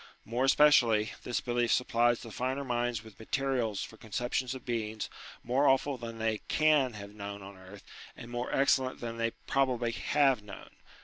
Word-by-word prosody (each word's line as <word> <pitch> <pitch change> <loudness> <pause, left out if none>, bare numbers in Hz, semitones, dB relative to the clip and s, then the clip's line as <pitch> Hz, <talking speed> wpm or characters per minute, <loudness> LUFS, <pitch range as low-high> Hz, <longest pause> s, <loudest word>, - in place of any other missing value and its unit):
More 120 +4 0
especially, 120 -7 +5
this 120 - -2
belief 120 -1 0
supplies 120 -1 +2
the 115 - -9
finer 130 +5 -2
minds 120 -3 -1
with 110 -2 -15
material 125 -2 -1
for 110 - -5
conceptions 120 +3 -2
of 130 - -10
beings 110 -3 -3 0.3
more 130 +4 +2
awful 135 +1 +3
than 115 -2 -7
they 110 -1 0
can 150 -5 +3
have 100 -1 -9
known 100 -1 -7
on 100 +1 -10
earth, 95 +2 -13 0.3
and 120 - -10
more 120 +1 -3
excel 135 -1 +3
lent 130 - -8
than 115 -1 -5
they 115 0 +1 0.2
probably 125 -3 +1
have 135 0 +2
known. 105 -2 -11
120 Hz, 175 wpm, -31 LUFS, 110-130 Hz, 0.3 s, especially